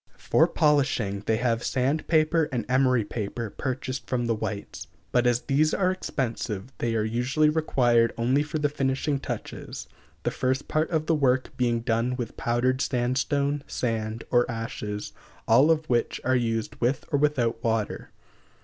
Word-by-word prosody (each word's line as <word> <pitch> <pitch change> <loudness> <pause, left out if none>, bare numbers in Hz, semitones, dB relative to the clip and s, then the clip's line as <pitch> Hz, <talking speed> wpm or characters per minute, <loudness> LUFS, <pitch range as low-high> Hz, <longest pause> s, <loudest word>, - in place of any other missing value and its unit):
For 160 - +3
polishing, 135 - +1
they 110 - +2
have 115 -1 0
sand 135 +5 0
paper 160 0 +3
and 120 -4 -2
emery 125 -3 +3
paper 110 +1 -4
purchased 130 0 -4
from 120 -2 -1
the 115 - +1
whites; 105 -2 -5 0.2
but 125 0 +3
as 120 0 +2
these 155 +3 +2
are 185 -2 +2
expensive, 120 - -3
they 115 -1 0
are 110 - +1
usually 125 +7 +1
required 120 -7 +3
only 125 +5 +2
for 150 +1 -3
the 150 -1 +2
finishing 140 0 -1
touches, - - -6 0.4
the - - 0
first 130 +2 -1
part 155 +1 0
of 160 -2 0
the 165 - +2
work 130 -4 +1
being 120 -2 +1
done 115 +2 0
with 120 -2 -5
powdered 125 +2 0
sandstone, 140 +3 0
sand, 115 -2 -2
or 120 0 +3
ashes, 110 -3 -5 0.3
all 130 +7 +6
of 160 -1 +2
which 120 -1 0
are 130 +1 +2
used 115 -3 -1
with 125 +3 +1
or 145 - +2
without 120 -6 +1
water. 110 -2 -1
125 Hz, 160 wpm, -26 LUFS, 115-145 Hz, 0.4 s, all